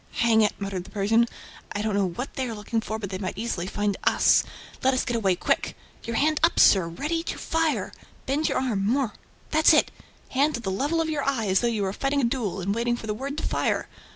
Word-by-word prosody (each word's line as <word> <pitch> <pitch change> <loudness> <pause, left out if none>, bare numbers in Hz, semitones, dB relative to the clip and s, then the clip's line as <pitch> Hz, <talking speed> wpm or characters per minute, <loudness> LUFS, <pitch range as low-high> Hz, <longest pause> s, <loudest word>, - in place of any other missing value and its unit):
"Hang 230 -1 +3
it!" 210 - +3
muttered 195 -3 -4
the - - -14
Persian. 225 +3 +2 0.5
"I 205 - -2
don't 215 -1 -1
know 200 -1 +2
what 245 +10 -6
they 260 -1 -2
are 225 - -4
looking 220 +2 -2
for, 220 0 -4
but 200 -3 -6
they 185 - -4
might 185 -1 -4
easily 205 -5 -3
find 205 0 -1
us... - - +4 0.4
Let 265 0 +3
us 255 - 0
get 240 - -1
away, 195 -5 +2
quick!... - - -1 0.3
Your 230 - -3
hand 305 +4 +2
up, 330 +2 +3
sir, 190 -4 +6
ready 300 - -2
to - - -5
fire!... 325 -1 0 0.3
Bend 290 +4 0
your - - 0
arm... 235 -7 0
more... 240 +2 +1 0.4
that's 315 +1 +6
it!... - - +3 0.4
Hand 285 +2 +1
at 240 - -9
the 190 - -2
level 290 - 0
of 320 - -1
your 290 -2 -1
eye, 260 -6 0
as 190 - +4
though 240 - +1
you 220 -3 0
were 190 0 -1
fighting 275 +5 0
a - - -2
duel 235 -6 -1
and 195 +3 -1
waiting 240 +2 0
for 230 - -8
the 215 - -2
word 275 +6 -5
to - - -3
fire! - - 0
230 Hz, 245 wpm, -25 LUFS, 200-275 Hz, 0.5 s, sir